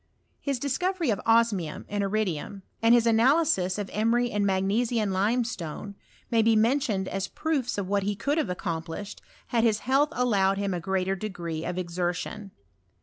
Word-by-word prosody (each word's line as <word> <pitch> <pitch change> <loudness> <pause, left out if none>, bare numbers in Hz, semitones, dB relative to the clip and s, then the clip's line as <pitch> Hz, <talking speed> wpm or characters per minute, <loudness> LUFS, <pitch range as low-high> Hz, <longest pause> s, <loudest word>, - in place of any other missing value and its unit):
His 280 -2 -2
dis 265 +1 -2
coTOry 360 - +1
of 195 - -5
osmium 225 -8 +2
and 205 0 -2
iridium, 195 -2 -2 0.2
and 230 +1 +6
his 235 -1 +3
analysis 230 - +3
of 205 -2 -3
emery 235 +3 +1
and 205 0 0
magnesian 205 +2 +1
limestone, 205 -3 -1 0.4
may 230 -1 +4
be 225 0 +4
mentioned 225 -4 +1
as 195 0 -3
proofs 280 -6 -2
of 200 -2 -2
what 200 +1 +1
he 205 +1 -1
could 285 +9 0
have 265 - -1
accomplished 175 +3 -5 0.3
had 230 -2 +2
his 220 -2 +2
health 275 +4 +2
allowed 200 -6 +2
him 200 -1 -1
a 175 - -2
greater 190 +1 -1
degree 175 -5 -5
of 180 - -3
eixertion. 180 +3 -3
210 Hz, 165 wpm, -27 LUFS, 190-235 Hz, 0.4 s, and